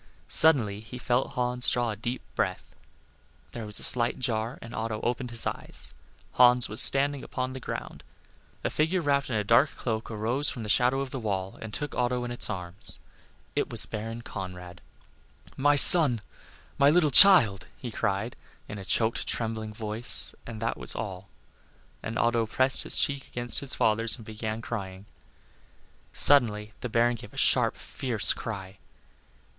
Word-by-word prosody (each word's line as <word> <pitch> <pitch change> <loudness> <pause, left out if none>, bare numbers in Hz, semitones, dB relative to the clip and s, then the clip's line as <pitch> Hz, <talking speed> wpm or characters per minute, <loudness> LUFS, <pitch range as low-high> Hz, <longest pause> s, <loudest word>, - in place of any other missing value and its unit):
Suddenly 120 -11 +1
he 110 +3 -11
felt 125 +1 -2
Hans 125 -1 -1
draw 120 -2 -1
a - - -6
deep 120 +5 -6
breath; - - -4 0.8
there 115 -3 -8
was 105 - -2
a - - -5
slight 120 -2 +3
jar, 115 -1 -3
and 115 - -12
Otto 110 -1 -4
opened 125 +1 -3
his 115 -1 0
eyes; - - -7 0.4
Hans 125 0 +4
was 110 - 0
standing 140 0 +2
upon 130 0 -5
the 130 - -8
ground. - - -8 0.6
A - - -2
figure 160 +5 -1
wrapped 140 -4 -1
in 120 - -3
a 105 - -1
dark 115 +8 +3
cloak 110 -2 -5
arose 115 +6 -1
from 125 -5 -7
the 105 - -7
shadow 125 +4 +2
of 135 -2 -6
the 135 - -6
wall, 95 -4 -5
and 110 - -8
took 145 +6 -6
Otto 125 0 -2
in 120 - -6
its 120 - 0
arms. 90 -1 -8 0.6
It - - -2
was - - +3
Baron 115 +2 -7
Conrad. 90 -3 -9 0.7
"My 145 +2 +2
son 140 -6 +10 0.6
my 140 0 +5
little 155 -1 +2
child!" 135 - +7
he 120 - -8
cried, 100 +3 -3 0.3
in 105 - -8
a 95 - -10
choked, 110 +3 -1
trembling 110 -1 -4
voice, 110 +2 0
and 115 -2 -8
that 115 - -3
was - - -1
all. 95 -3 -7 0.7
And 115 +1 -6
Otto 115 -1 0
pressed 130 +4 +1
his - - -1
cheek 140 -1 -1
against 120 -2 -2
his 140 -2 -1
father's 115 +1 0
and 115 - -14
began 110 +1 -6
crying. 95 -4 -7 1.1
Suddenly 110 - +2
the 125 - -5
Baron 120 +1 0
gave - - -14
a - - -14
sharp, - - +2
fierce 120 -6 +1
cry. 95 -3 -8
115 Hz, 170 wpm, -26 LUFS, 110-130 Hz, 1.1 s, son